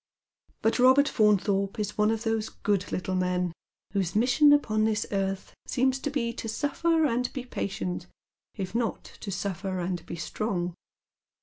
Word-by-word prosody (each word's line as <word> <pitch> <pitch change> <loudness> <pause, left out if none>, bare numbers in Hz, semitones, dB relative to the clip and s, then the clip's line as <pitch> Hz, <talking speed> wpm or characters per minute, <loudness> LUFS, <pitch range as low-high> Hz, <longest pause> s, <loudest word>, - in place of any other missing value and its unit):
But 225 - +3
Eobert 260 +3 +6
Faunthorpe 200 -3 +2
is 210 -1 -2
one 210 0 +3
of 225 0 -1
those 225 -1 0
good 200 -2 -1
little 185 0 -2
men 180 -1 0 0.4
whose 190 -3 -1
mission 255 +7 +5
upon 215 -7 +3
this 220 0 +1
earth 195 -1 -2
seems 260 0 +1
to 290 - -2
be 240 -5 -1
to 225 - -5
suffer 320 +6 +1
and 250 -2 0
be 260 -3 -5
patient, 185 -6 -3 0.5
if 190 -2 -4
not 235 -1 -1 0.2
to 205 - -6
suffer 190 0 -3
and 175 -1 -2
be - - -5
strong. 175 0 -2
215 Hz, 160 wpm, -28 LUFS, 190-245 Hz, 0.5 s, Eobert